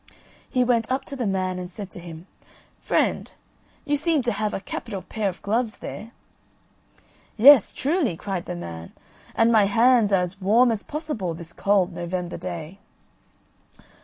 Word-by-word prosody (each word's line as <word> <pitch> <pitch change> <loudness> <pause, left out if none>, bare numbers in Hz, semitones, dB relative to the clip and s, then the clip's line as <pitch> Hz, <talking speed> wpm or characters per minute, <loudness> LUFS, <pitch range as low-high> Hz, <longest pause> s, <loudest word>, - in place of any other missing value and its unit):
He 250 -2 +2
went 235 -1 +1
up 265 +1 -1
to 280 - -7
the 245 -5 -2
man, 185 -1 -1
and 180 -1 -6
said 195 +1 -8
to - - -10
him, 170 -1 -10 0.5
"Friend, - - 0 0.5
you 290 0 +1
seem 305 -1 +1
to 240 - +1
have 215 -2 -2
a - - -3
capital 195 0 -6
pair 215 -3 -2
of 180 - -10
gloves 225 +2 -1
there." 220 - -8 1.3
"Yes, 260 0 +8
truly," 285 - 0
cried 190 -1 -4
the - - -5
man; 85 -1 -8 0.4
"and 225 +1 +4
my 215 -3 +5
hands 230 0 +4
are 190 -2 +3
as 185 +2 -7
warm 230 +6 +4
as 220 -3 -1
possible 295 - -4
this 170 0 -11
cold 195 -3 +1
November 175 0 -4
day." 175 +1 -7
205 Hz, 160 wpm, -24 LUFS, 180-240 Hz, 1.3 s, Yes